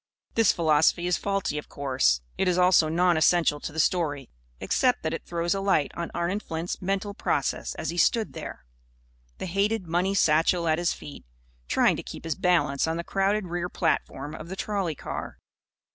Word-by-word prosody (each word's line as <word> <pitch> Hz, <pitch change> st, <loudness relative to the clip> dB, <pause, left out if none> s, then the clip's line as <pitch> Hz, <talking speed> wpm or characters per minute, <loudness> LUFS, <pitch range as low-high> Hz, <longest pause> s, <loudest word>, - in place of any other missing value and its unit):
This 225 Hz, -3 st, +4 dB
philosophy 160 Hz, +1 st, +3 dB
is 180 Hz, 0 st, +2 dB
faulty, 195 Hz, -7 st, -1 dB
of -, -, -11 dB
course. 130 Hz, -, +1 dB
It 190 Hz, -, 0 dB
is 180 Hz, -1 st, +2 dB
also 180 Hz, -3 st, +5 dB
non 175 Hz, +1 st, +3 dB
essential 160 Hz, -2 st, +3 dB
to 150 Hz, -, -6 dB
the 160 Hz, -, -5 dB
story; 150 Hz, -6 st, 0 dB, 0.3 s
except -, -, +1 dB
that -, -, -1 dB
it -, -, -5 dB
throws 170 Hz, +1 st, 0 dB
a 195 Hz, -, -2 dB
light 195 Hz, -7 st, +1 dB
on 170 Hz, 0 st, -4 dB
Arnon 175 Hz, +4 st, -1 dB
Flint's 165 Hz, -3 st, -5 dB
mental 195 Hz, +2 st, -2 dB
processes -, -, -1 dB
as -, -, -3 dB
he 175 Hz, -, -7 dB
stood 220 Hz, +6 st, +2 dB
there, 65 Hz, -, -8 dB, 0.7 s
the -, -, -5 dB
hated 200 Hz, +3 st, 0 dB
money 180 Hz, +4 st, 0 dB
satchel 165 Hz, 0 st, +3 dB
at 160 Hz, +1 st, +2 dB
his 175 Hz, -, +1 dB
feet, 145 Hz, -, -9 dB, 0.4 s
trying -, -, +3 dB
to -, -, -4 dB
keep -, -, -9 dB
his 165 Hz, -1 st, -1 dB
balance 160 Hz, -6 st, +1 dB
on 160 Hz, +1 st, -1 dB
the 170 Hz, -, -3 dB
crowded 195 Hz, +3 st, 0 dB
rear 175 Hz, 0 st, -3 dB
platform 145 Hz, -3 st, -2 dB
of 160 Hz, +1 st, -8 dB
the 190 Hz, -, -5 dB
trolley 195 Hz, -5 st, -2 dB
car. -, -, -6 dB
170 Hz, 190 wpm, -26 LUFS, 155-190 Hz, 0.7 s, also